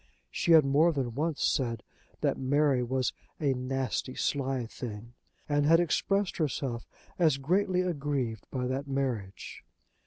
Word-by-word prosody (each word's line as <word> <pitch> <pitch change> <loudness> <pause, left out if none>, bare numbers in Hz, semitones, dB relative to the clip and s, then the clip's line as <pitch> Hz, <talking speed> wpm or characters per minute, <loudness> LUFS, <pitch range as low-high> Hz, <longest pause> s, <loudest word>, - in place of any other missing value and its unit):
She 170 - +2
had 155 -3 +7
more 150 +5 +4
than 130 -6 -2
once 150 +3 -1
said 115 -4 0 0.4
that - - +1
Mary 140 0 +2
was 130 +1 0 0.3
a 140 -3 +2
"nasty 130 0 -2
sly 135 -3 -1
thing," 115 0 -8 0.3
and 145 -1 +2
had 165 +1 +6
expressed 195 +3 +1
herself 135 -6 -2 0.3
as 155 -6 +4
greatly 180 +6 +1
aggrieved 140 - -2
by 125 -2 -2
that 135 +2 -2
marriage. 130 -8 -3
135 Hz, 135 wpm, -29 LUFS, 125-155 Hz, 0.4 s, had